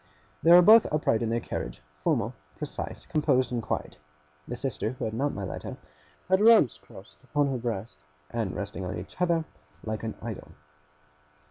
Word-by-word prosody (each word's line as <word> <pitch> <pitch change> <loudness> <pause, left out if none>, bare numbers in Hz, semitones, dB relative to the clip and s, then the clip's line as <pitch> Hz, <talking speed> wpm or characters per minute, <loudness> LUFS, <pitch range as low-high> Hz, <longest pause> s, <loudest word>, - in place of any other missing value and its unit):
They 165 - +5
were 175 +1 +10
both 220 +4 +8
upright 150 -7 +1
in 115 - 0
their 115 +1 +1
carriage, - - -5 0.2
formal, - - +1 0.2
precise, - - -5
composed, 140 -5 +1
and 120 -1 -1
quiet. 90 - -4 0.5
The 120 - -4
sister 125 -2 -3
who 130 - -4
had 110 - -3
not 140 +5 0
my 100 - -5
letter, 95 - -6 0.5
had 190 +1 +4
her 215 +2 +7
arms 180 - +4
crossed 95 +3 -15 0.2
on 145 -1 +3
her 130 - -2
breast, 110 -9 -5 0.3
and 115 -5 -2
resting 100 -1 -5
on 90 - -4
each 95 - -9
other, 170 -2 +2 0.4
like 110 -1 -3
an 110 -1 -4
Idol. 110 -3 -7
120 Hz, 175 wpm, -28 LUFS, 110-150 Hz, 0.5 s, were